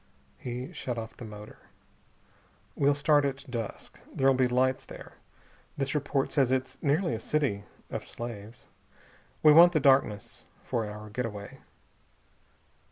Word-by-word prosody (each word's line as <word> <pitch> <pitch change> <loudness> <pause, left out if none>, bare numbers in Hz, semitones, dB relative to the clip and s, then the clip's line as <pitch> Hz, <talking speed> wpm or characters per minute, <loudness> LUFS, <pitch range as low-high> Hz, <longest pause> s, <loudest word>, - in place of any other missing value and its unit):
He 125 +1 -5
shut 125 -2 -4
off 110 -1 -6
the 120 - -9
motor. 105 -1 -11 1.2
"We'll 140 0 +3
start 145 0 +3
at 140 0 -2
dusk. 115 -4 -6
There'll 135 0 +3
be 130 -1 +3
lights 130 +1 +1
there. - - -11 0.6
This 140 0 -1
report 145 -2 0
says 135 -3 +2
it's 130 0 -2
nearly 150 0 +1
a 110 - -3
city 115 -7 -1 0.3
of - - -5
slaves. 115 -1 -8 0.8
We 150 - +8
want 175 +3 +8
the 155 - +3
darkness 135 -7 +2 0.2
for 115 -4 -2
our 105 0 -9
getaway." 105 -3 -5
130 Hz, 135 wpm, -29 LUFS, 115-140 Hz, 1.2 s, We